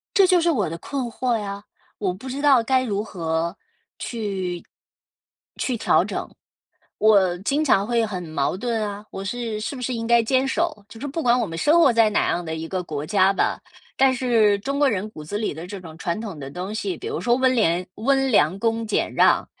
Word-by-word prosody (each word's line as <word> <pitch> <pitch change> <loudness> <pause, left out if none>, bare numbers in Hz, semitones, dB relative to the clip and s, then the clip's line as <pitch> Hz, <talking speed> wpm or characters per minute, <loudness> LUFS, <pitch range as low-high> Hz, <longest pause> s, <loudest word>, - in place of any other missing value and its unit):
这 395 - +7
就 360 -2 +4
是 340 - +2
我 205 - 0
的 165 - -5
困 270 +9 -4
惑 240 0 -1
呀， 200 -1 -5 0.3
我 190 -3 -1
不 205 +8 -10
知 275 +2 -4
道 275 -5 +5
该 260 +2 +2
如 210 -4 -2
何 170 -2 -2 0.4
去 190 -6 -4 0.9
去 250 -3 -1
调 - - +3
整。 - - -4 0.7
我 195 -5 +4
经 275 +11 0
常 205 -9 +3
会 235 -1 +1
很 185 -4 -5
矛 155 0 -2
盾 230 +1 -2
啊， 205 +1 -6
我 195 - -6
是 225 0 -3
是 275 - -4
不 250 - -7
是 250 +1 -2
应 230 -1 -3
该 235 0 +4
坚 260 +3 +1
守？ 330 -9 -1
就 225 - -12
是 285 - -4
不 310 +4 -3
管 245 0 +3
我 235 - 0
们 165 -3 -6
生 310 - +4
活 270 -7 +6
在 225 -1 +4
哪 - - +1
样 175 +1 0
的 160 -1 -4
一 160 0 -5
个 185 +1 -3
国 150 -4 -5
家 195 +2 +3
吧， - - 0 0.4
但 265 0 +5
是 230 -5 +3
中 275 +5 -3
国 290 - +4
人 210 -3 -1
骨 155 - -10
子 180 +7 -5
里 215 - -1
的 160 +4 -8
这 200 +1 -7
种 165 -3 -11
传 170 +4 -2
统 205 -8 -6
的 135 -1 -7
东 185 +7 -5
西， 365 - -3
比 415 - -9
如 440 0 -3
说 240 - +2
温 260 0 +3
廉 180 -5 +1
温 270 +3 +1
良 160 0 +3
恭 225 +1 0
俭 210 - -1
让， - - +4
215 Hz, 240 characters per minute, -23 LUFS, 185-255 Hz, 0.9 s, 这